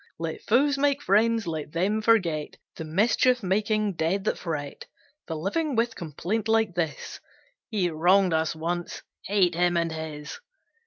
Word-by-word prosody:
Let 165 -1 -4
foes 280 +4 +2
make 285 0 +2
friends: 225 +2 +3
let 155 -2 -5
them 200 +6 0
forget 180 -10 +1 0.2
The - - -6
mischief 225 +8 +2
making 205 0 0
dead 170 +5 0
that - - 0
fret 150 -5 -5 0.4
The 160 - -4
living 250 - -1
with 230 +1 +1
complaint 180 +7 -3
like 225 -3 +2
this 165 -4 -3 0.5
"He 205 -6 0
wronged 180 +3 +3
us 160 0 0
once, 170 +2 -4 0.2
hate 190 -3 +3
him 175 +1 +2
and 165 -1 0
his." 155 -2 -6
185 Hz, 150 wpm, -26 LUFS, 160-220 Hz, 0.5 s, friends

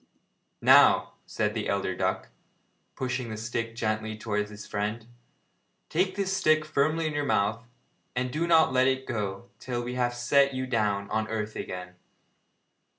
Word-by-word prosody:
'Now,' - - +6 0.2
said - - -1
the - - -3
elder - - -1
duck, - - -1 0.7
pushing 130 -2 -3
the 110 - -5
stick 115 +1 -3
gently 110 -1 -2
towards 105 -1 -2
his 105 -1 -10
friend, 105 +2 -3 0.8
'take 185 +3 +1
this 195 -1 -1
stick 155 -3 +3
firmly 155 +2 +1
in 155 - -1
your 145 0 -1
mouth, 115 -1 0 0.5
and 125 0 -1
do 165 +3 0
not 160 -5 +5
let 130 0 +4
it 130 0 0
go 105 +1 -4
till 120 -2 -3
we 120 +1 -4
have 120 -1 0
set 140 +3 +3
you 130 0 -2
down 105 -5 0
on 110 0 0
earth 105 -1 -3
again.' 90 0 -6
120 Hz, 155 wpm, -28 LUFS, 110-140 Hz, 0.8 s, Now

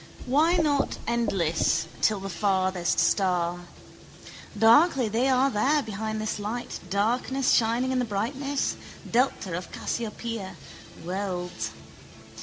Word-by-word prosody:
Why 310 +7 +3
not 290 -4 +1
endless 195 -9 +1 0.2
till 215 -2 +2
the 195 - -5
farthest 185 -3 0
star? 175 -2 +1 0.9
Darkly 250 +2 +5
they 235 +5 +1
are 265 +1 +3
there 275 +7 +2
behind 220 0 -4
this 215 -1 -3
light, 220 +4 -4
darkness 245 +7 +1
shining 235 +3 +2
in 260 - +1
the - - +1
brightness, 265 +7 -2 0.3
delta 230 -7 +1
of 180 0 -6
Cassiopeia, 225 -4 -4 0.5
worlds. 180 - -3
220 Hz, 110 wpm, -26 LUFS, 190-255 Hz, 0.9 s, Darkly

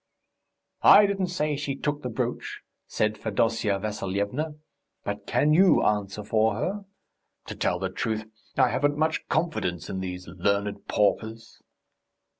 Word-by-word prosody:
"I 210 - +8
don't 195 -2 0
say 155 -4 -1
she 140 -1 -3
took 145 +1 -2
the 125 - -4
brooch," 110 - -3 0.3
said 110 0 -1
Fedosya 110 -1 0
Vassilyevna, 105 +8 -3 0.5
"but 100 0 -5
can 150 +1 +3
you 185 +3 +5
answer 105 0 0
for 110 +1 +2
her? 200 +2 -3 0.6
To - - -7
tell 90 - 0
the 95 +1 -2
truth, 110 +2 -2 0.3
I 130 -2 +5
haven't 145 +3 +1
much 160 +1 0
confidence 155 - -1
in 95 - -3
these 90 -1 -5
learned 100 +3 -1
paupers." 110 +2 -1
110 Hz, 135 wpm, -26 LUFS, 100-150 Hz, 0.6 s, I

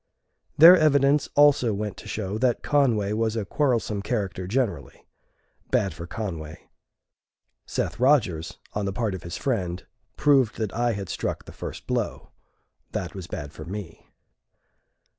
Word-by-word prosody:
Their 170 +4 +10
evidence 145 -3 +3
also 140 -7 +5
went 105 0 -4
to - - -11
show 105 0 -3
that 125 -1 +1
Conway 115 -8 +2
was 110 0 0
a 110 -3 -2
quarrelsome 115 -5 0
character 100 -4 -3
generally. 120 +1 -2 0.6
Bad 95 - +1
for 85 - -8
Conway. 80 -7 -6 1.0
Seth - - -3
Rodgers, 110 - +2 0.2
on 105 -1 -2
the 100 - -2
part 110 -1 -1
of 95 - -6
his 85 - -6
friend, 95 -9 -2 0.3
proved 135 -6 +3
that 110 -4 -3
I 120 0 +1
had 100 -2 -5
struck - - -3
the - - -10
first - - -8
blow. - - -3 0.6
That 90 - -3
was 95 -3 -7
bad 75 -9 -6
for 75 - -9
me. 90 0 -8
105 Hz, 145 wpm, -25 LUFS, 95-130 Hz, 1.0 s, Their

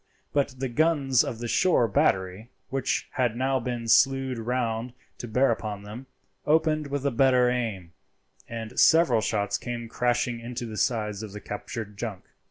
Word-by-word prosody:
But 140 -3 0
the 135 +1 -2
guns 140 -1 +2
of 115 - -4
the 120 +1 -5
shore 125 -2 +3
battery, 95 +2 0 0.2
which 135 -1 -1
had 120 -3 0
now 130 +2 +1
been 120 -1 -4
slewed 135 +1 +3
round 120 0 -2 0.3
to 120 - -6
bear 125 +3 +3
upon 105 -3 -4
them, 110 +6 -9 0.4
opened 155 -1 +2
with 140 0 -3
a 140 - +2
better 125 0 +4
aim, 105 -9 -3 0.6
and 115 +1 -5
several 160 -9 +5
shots 100 -1 -1
came 120 -1 -5
crashing 120 0 0
into 120 +1 -5
the 110 -2 -7
sides 105 -2 -1
of 105 -3 -8
the 105 - -6
captured 105 0 -6
junk. 105 -4 -5
120 Hz, 165 wpm, -26 LUFS, 110-130 Hz, 0.6 s, several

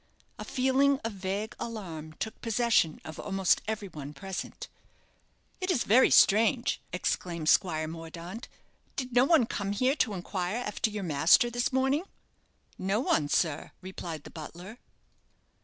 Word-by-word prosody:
A - - -4
feeling 265 +1 +2
of 225 - -2
vague 200 +3 -4
alarm 170 -9 -6
took 220 +7 -6
possession 230 -8 +2
of 160 - -8
almost 195 -2 +1
everyone 180 -10 -5
present. 190 -1 -6 0.9
"It 370 0 -3
is 310 -10 +2
very 245 +6 +5
strange," 225 +5 +4
exclaimed 170 -3 -1
Squire 155 -4 +3
Mordaunt. 165 +6 -8 0.5
"Did 255 -2 -4
no 245 +1 +5
one 300 -5 +5
come 200 -3 -3
here 255 +6 +2
to 210 - +1
inquire 180 +2 -3
after 220 -2 -1
your 210 -1 -5
master 165 +9 +4
this 240 0 0
morning?" 265 +4 +1 0.8
"No 195 +3 0
one, 155 - +1
sir," 155 -2 0
replied 170 -5 -6
the - - -11
butler. 175 +8 -9
200 Hz, 140 wpm, -29 LUFS, 170-240 Hz, 0.9 s, very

